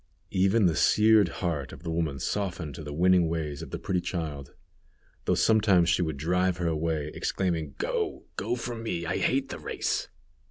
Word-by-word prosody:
Even 95 +3 +3
the 85 -3 +3
seared 110 +1 +5
heart 80 -6 -3
of - - -11
the 85 - -3
woman 80 -4 -1
softened 85 +1 -3
to 80 - -8
the 75 - -6
winning 90 +2 +4
ways 75 -4 -3
of - - -7
the - - -4
pretty 90 -2 -1
child, 75 -7 -5 0.7
though - - +2
sometimes 100 -6 +4
she 85 - +3
would 80 -4 -1
drive 90 +4 +1
her 90 - -2
away, 80 -2 -1
exclaiming: 80 -6 -2
"Go, - - -2
go 115 +5 -1
from 120 -1 -5
me 90 -7 -3
I 90 - -1
hate 135 +1 +1
the - - -6
race." - - -2
85 Hz, 185 wpm, -28 LUFS, 80-95 Hz, 0.7 s, seared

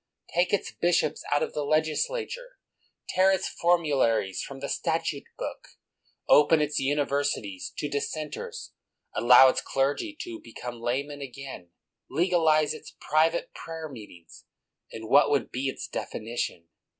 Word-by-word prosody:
Take 175 +2 +2
its 205 - 0
bishops 170 -3 +1
out 145 - +3
of - - -4
the 150 - -2
legislature, 435 - -1 0.5
tear 190 +1 +4
its 190 -1 0
formularies 140 - +1
from 135 -1 -7
the 140 - -4
Statute 160 -3 -1
Book, - - -7 0.5
open 150 +2 +6
its 150 0 0
universities 140 -8 -1
to 150 - -2
Dissenters, 155 - -4 0.4
allow 125 +2 +8
its 130 - +2
clergy 145 - -1
to 350 -2 -6
be - - -14
come 120 -1 -7
laymen 140 +4 -2
again, 135 -8 -8 0.4
legalize 160 -1 +3
its - - -11
private 160 +3 +1
prayer 160 -1 -7
meetings, 105 - -13 0.5
and 110 0 -7
what 145 +4 +6
would 140 -6 +1
be 130 +2 -2
its - - -6
definition 110 -7 -4
145 Hz, 135 wpm, -27 LUFS, 130-165 Hz, 0.5 s, allow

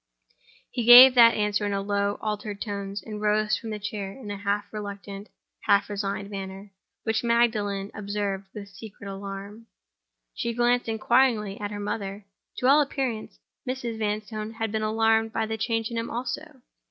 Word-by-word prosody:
He 240 - -2
gave 245 +2 +11
that 235 -2 +7
answer 210 0 0
in 205 -1 -1
low, 200 0 0
altered 210 -1 -4
tones; 200 -2 -5
and 210 -1 -7
rose 215 0 +2
from 225 - -6
his 210 -1 -6
chair 200 -3 -5
in 210 -1 -9
a - - -3
half 205 0 -1
reluctant, 200 -1 -7 0.4
half 200 +1 +3
resigned 200 0 -3
manner, 195 0 -7 0.3
which 220 0 0
Magdalen 215 -4 +1
observed 200 -2 -3
with 205 -1 -8
secret 200 +1 -11
alarm. 200 +3 -7 0.7
She 235 -1 -3
glanced 240 0 +2
inquiringly 220 -2 +2
at 205 - -2
her 205 0 -6
mother. 205 -1 -4 0.3
To - - -2
all 285 +3 +6
appearance, 265 -6 -3 0.3
Mrs. 245 -3 -3
Vanstone 215 +1 -3
had 225 -1 -3
been 220 0 -1
alarmed 225 +1 +2
by 225 - 0
the 220 0 -3
change 225 +1 -1
in 230 - -2
him 230 - -4
also. 260 +3 -5
215 Hz, 165 wpm, -26 LUFS, 200-230 Hz, 0.7 s, gave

